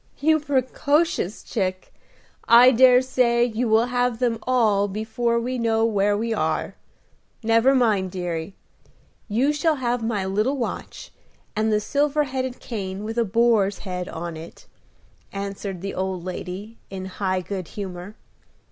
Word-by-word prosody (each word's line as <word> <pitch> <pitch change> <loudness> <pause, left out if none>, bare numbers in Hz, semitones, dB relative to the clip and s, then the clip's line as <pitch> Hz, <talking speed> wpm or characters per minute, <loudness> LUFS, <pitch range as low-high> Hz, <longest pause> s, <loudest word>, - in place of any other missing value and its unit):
"You 315 +1 +3
precocious 285 - 0
chick! 185 -5 -3 0.5
I 240 +2 +8
dare 250 +1 +6
say 240 -2 +2
you 235 0 -1
will 220 +2 +4
have 245 -1 0
them 235 -2 0
all 215 -6 +3
before 220 +3 -1
we 250 +2 -3
know 225 -1 +2
where 205 -2 +2
we 230 +1 -1
are. - - -1 0.7
Never 230 +4 +4
mind, 215 -7 +2
deary; 175 0 -4 0.7
you 250 +7 +1
shall 310 +1 +1
have 245 -3 -1
my 215 -4 -1
little 215 +9 0
watch, 245 - -5 0.4
and 220 +1 +1
the 210 - +3
silver 290 +6 +1
headed 260 -2 -4
cane 195 -3 -5
with 225 +2 -3
a 235 - +2
boar's 215 -2 +2
head 180 -1 -4
on 170 0 -5
it," 160 +1 -11 0.7
answered 195 -2 -5
the 195 0 -4
old 185 -2 -3
lady, 190 +4 -6
in 190 -1 -6
high 185 0 -2
good 185 -1 -5
humor. 190 0 -7
225 Hz, 145 wpm, -23 LUFS, 195-250 Hz, 0.7 s, I